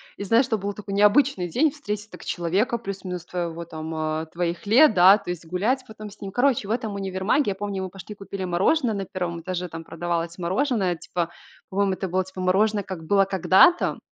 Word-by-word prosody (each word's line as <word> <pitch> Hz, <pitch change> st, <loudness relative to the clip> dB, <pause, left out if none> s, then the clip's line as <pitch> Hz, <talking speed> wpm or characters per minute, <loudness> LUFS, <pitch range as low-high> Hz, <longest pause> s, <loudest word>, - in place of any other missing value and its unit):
И -, -, -6 dB
знаешь, 230 Hz, +6 st, +4 dB
это 225 Hz, -, +1 dB
был 200 Hz, 0 st, -3 dB
такой 200 Hz, -1 st, -7 dB
необычный 205 Hz, -1 st, +3 dB
день 290 Hz, -, +2 dB
встретить 210 Hz, -8 st, -5 dB
так -, -, -12 dB
человека, 185 Hz, +8 st, 0 dB
плюс-минус 190 Hz, -5 st, -6 dB
твоего 170 Hz, -2 st, -4 dB
там, 160 Hz, 0 st, -7 dB
э, 155 Hz, 0 st, -2 dB
твоих 170 Hz, +1 st, -3 dB
лет, 235 Hz, +6 st, +6 dB
да, 190 Hz, +2 st, +7 dB
то 200 Hz, -, -10 dB
есть, 175 Hz, -1 st, -5 dB
гулять 210 Hz, +10 st, 0 dB
потом 215 Hz, -1 st, -9 dB
с 205 Hz, -, -17 dB
ним. 195 Hz, -, -6 dB
Короче, 245 Hz, -2 st, +1 dB
в -, -, -1 dB
этом 225 Hz, -2 st, -2 dB
универмаге, 195 Hz, +8 st, 0 dB
я -, -, -4 dB
помню, 200 Hz, -1 st, -4 dB
мы 185 Hz, -, -4 dB
пошли 195 Hz, +3 st, -10 dB
купили 195 Hz, -1 st, -6 dB
мороженое 220 Hz, -, +2 dB
на 195 Hz, -1 st, -3 dB
1 175 Hz, -2 st, -4 dB
этаже, 180 Hz, +1 st, -4 dB
там 165 Hz, -1 st, -8 dB
продавалось 170 Hz, 0 st, -3 dB
мороженое 190 Hz, +1 st, 0 dB
типа, 170 Hz, 0 st, -4 dB, 0.4 s
по-моему, 195 Hz, 0 st, +1 dB
это 190 Hz, +1 st, -3 dB
было 185 Hz, +1 st, 0 dB
типа 190 Hz, 0 st, -11 dB
мороженое 200 Hz, +3 st, +2 dB
"как 185 Hz, -3 st, -7 dB
было 195 Hz, +3 st, +4 dB
когда-то". 190 Hz, -, +4 dB
190 Hz, 205 wpm, -24 LUFS, 175-210 Hz, 0.4 s, да